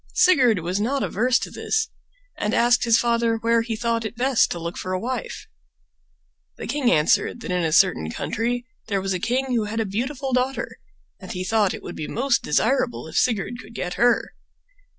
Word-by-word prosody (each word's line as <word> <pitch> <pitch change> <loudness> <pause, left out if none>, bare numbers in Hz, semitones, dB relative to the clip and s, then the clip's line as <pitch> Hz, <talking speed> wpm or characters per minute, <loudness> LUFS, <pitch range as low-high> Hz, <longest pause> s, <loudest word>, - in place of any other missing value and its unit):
Sigurd 255 - +5
was 180 +3 -2
not 265 +5 0
averse 250 +4 +2
to - - -5
this 440 0 -1 0.5
and 210 +2 -1
asked 245 +1 +3
his 230 -1 +5
father 235 -1 +1
where 230 +1 +2
he 225 0 -3
thought 230 0 -1
it 220 +2 -5
best 255 +1 +2
to - - -3
look 170 0 -5
for 185 - -4
a 185 - 0
wife. 260 - -4 1.1
The - - -6
king 280 -5 +1
answered 150 +9 +2
that 225 - -5
in 180 -1 0
a 160 - 0
certain 165 - +3
country 240 - -2 0.2
there 200 -3 0
was 190 0 -2
a 180 - -2
king 255 +6 -1
who 225 -3 +1
had 220 +2 -3
a 225 - 0
beautiful 260 +6 -3
daughter, 255 +2 -1 0.4
and 185 - -9
he 180 - -3
thought 210 -1 +1
it - - -11
would - - -7
be 155 - -5
most 250 0 +1
desirable 240 - 0
if - - -10
Sigurd 240 +1 0
could 230 +2 -15
get 180 -3 -3
her. 240 0 +2
230 Hz, 200 wpm, -23 LUFS, 195-250 Hz, 1.1 s, Sigurd